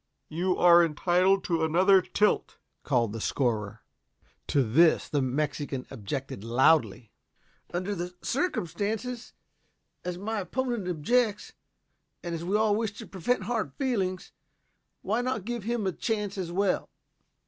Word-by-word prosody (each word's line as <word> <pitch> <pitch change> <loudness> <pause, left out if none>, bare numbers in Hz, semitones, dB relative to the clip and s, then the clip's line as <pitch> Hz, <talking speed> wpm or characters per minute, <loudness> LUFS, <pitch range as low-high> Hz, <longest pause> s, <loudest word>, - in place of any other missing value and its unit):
"You 180 +4 0
are 175 -1 +7
entitled 180 +4 +2
to 165 -2 0
another 185 +4 +5
tilt," 210 +3 0 0.2
called 120 -6 0
the 115 - -5
scorer. 110 -7 -1 0.6
To 140 - +2
this 155 +9 +4
the 145 - 0
Mexican 135 0 -2
objected 130 -2 -5
loudly. 120 0 +2 0.6
"Under 185 +3 -2
the 180 -1 -5
circumstances, 225 - -2 0.7
as 180 0 -4
my 215 +3 -3
opponent 240 0 -2
objects, 210 +6 0 0.7
and 170 -1 -4
as 165 0 -4
we 185 +4 -1
all 215 -1 +3
wish 220 -1 -1
to 220 +2 -9
prevent 195 +4 -1
hard 225 +2 -2
feelings, 200 -10 -2 0.7
why 220 +5 0
not 245 -6 -2
give 235 -3 -4
him 235 -2 -1
a 190 - +1
chance 210 0 -2
as 180 -3 -4
well? 195 +1 0
185 Hz, 135 wpm, -28 LUFS, 155-215 Hz, 0.7 s, are